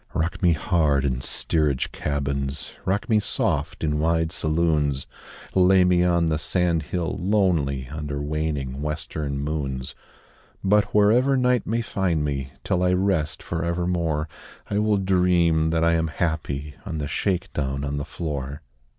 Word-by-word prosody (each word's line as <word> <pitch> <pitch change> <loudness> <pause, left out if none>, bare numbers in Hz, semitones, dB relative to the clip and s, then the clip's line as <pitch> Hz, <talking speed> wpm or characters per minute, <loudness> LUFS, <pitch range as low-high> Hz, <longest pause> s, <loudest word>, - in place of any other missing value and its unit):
Rock 85 +3 -1
me 90 -3 +5
hard 75 -3 +1
in 65 -2 -1
steerage 75 -3 0
cabins, 70 -1 -3
Rock 100 +2 0
me 110 -2 +4
soft 105 - -1
in 75 -1 0
wide 80 0 +1
saloons, 75 -4 +1 0.5
Lay 95 0 +5
me 90 -1 +3
on 85 -1 +3
the 80 -1 0
sand 85 -1 +1
hill 85 +2 -3
lonely 85 -9 +1
Under 75 0 -4
waning 75 -3 -2
western 75 -2 -3
moons; 70 -3 -3 0.7
But 105 +1 +4
wherever 115 +7 +3
night 125 -2 +2
may 115 +2 0
find 90 -8 0
me 70 -2 -3
Till 90 - 0
I 90 0 +3
rest 90 -5 0
for 85 0 -3
evermore 85 -3 -1 0.4
I 100 - +1
will 105 -1 +2
dream 90 -4 +3
that 80 0 +1
I 85 0 +4
am 80 0 +1
happy 75 -3 -2
On 90 -6 -4
the 75 -2 -3
shake 95 +4 -1
down 70 -1 -2
on 70 0 -2
the 70 - -2
floor. 70 -3 -5
80 Hz, 150 wpm, -24 LUFS, 75-90 Hz, 0.7 s, me